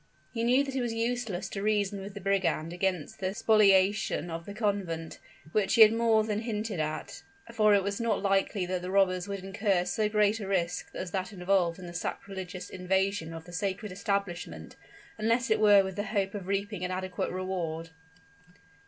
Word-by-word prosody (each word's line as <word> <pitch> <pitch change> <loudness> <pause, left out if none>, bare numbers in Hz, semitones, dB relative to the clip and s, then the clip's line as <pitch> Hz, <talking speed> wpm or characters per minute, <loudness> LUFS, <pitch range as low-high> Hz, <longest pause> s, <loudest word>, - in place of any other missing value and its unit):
He 230 -1 -2
knew 250 +4 +4
that 270 -1 -5
it 265 - 0
was 235 -2 -2
useless 230 -5 -2
to 195 - -5
reason 205 -1 0
with 195 +1 -8
the 200 - -7
brigand 185 -4 0
against 180 -3 -2
the 190 +1 -2
spoliation 200 -4 +3
of 165 0 -6
the 205 - -6
convent, 195 -7 -2 0.3
which 205 0 +2
he 230 - +5
had 215 0 +6
more 225 -1 +3
than 210 -1 -1
hinted 215 -4 -3
at; 155 0 -4 0.3
for 215 -1 +5
it 200 - +2
was 200 +3 -2
not 225 -4 0
likely 195 -1 +1
that 180 0 -2
the 180 - -5
robbers 185 -1 +2
would 200 -2 -5
incur 195 -2 0
so 215 +1 0
great 210 0 +2
a 200 - -5
risk 180 -3 -1
as 180 - -5
that 185 0 -2
involved 180 -3 +1
in 185 - -9
the 175 - -8
sacrilegious 185 +1 -5
invasion 190 -2 0
of 165 0 -8
the 175 - -12
sacred 195 +2 -3
establishment, 180 - -3 0.4
unless 230 +2 +1
it 220 - +4
were 205 -2 +7
with 190 -1 -6
the 205 - 0
hope 200 -2 -1
of 195 -3 -6
reaping 200 -1 -2
an 180 - -1
adequate 185 0 -3
reward. 170 -3 -3
195 Hz, 190 wpm, -29 LUFS, 180-210 Hz, 0.4 s, were